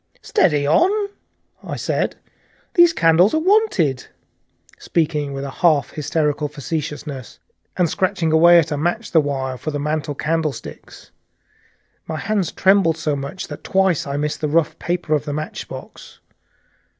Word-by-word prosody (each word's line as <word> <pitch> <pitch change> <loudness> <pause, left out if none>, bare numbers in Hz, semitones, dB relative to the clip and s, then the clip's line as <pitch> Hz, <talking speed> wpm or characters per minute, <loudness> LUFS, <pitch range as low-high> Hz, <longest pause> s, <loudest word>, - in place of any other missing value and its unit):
"Steady 150 - +2
on!" 325 - +4 0.7
I - - -5
said, - - -1 0.6
"those 345 -1 +6
candles 170 - +4
are - - +3
wanted," 315 - +2 0.7
speaking 150 -3 -1
with 135 0 -5
a 140 - -5
half 155 -5 +3
hysterical 150 0 -1
facetiousness, 145 -2 -5 0.4
and 180 - +3
scratching 165 -1 0
away 170 +2 +7
at 165 -1 +2
a 150 - -1
match 170 +4 -2
the 160 - +5
while, 135 -3 -3
"for - - -4
the 145 -1 -3
mantel 150 0 -2
candlesticks." 155 -1 -4 1.0
My 160 - -4
hands 200 -2 -1
trembled 190 -4 +3
so 155 -2 -1
much 140 +6 -6
that - - -8
twice 190 -6 +1
I 140 0 -3
missed 150 +1 -2
the 155 - 0
rough 155 +1 +1
paper 175 -2 -2
of 150 -1 0
the 145 - -3
matchbox. 155 +1 -8
155 Hz, 145 wpm, -20 LUFS, 145-175 Hz, 1.0 s, away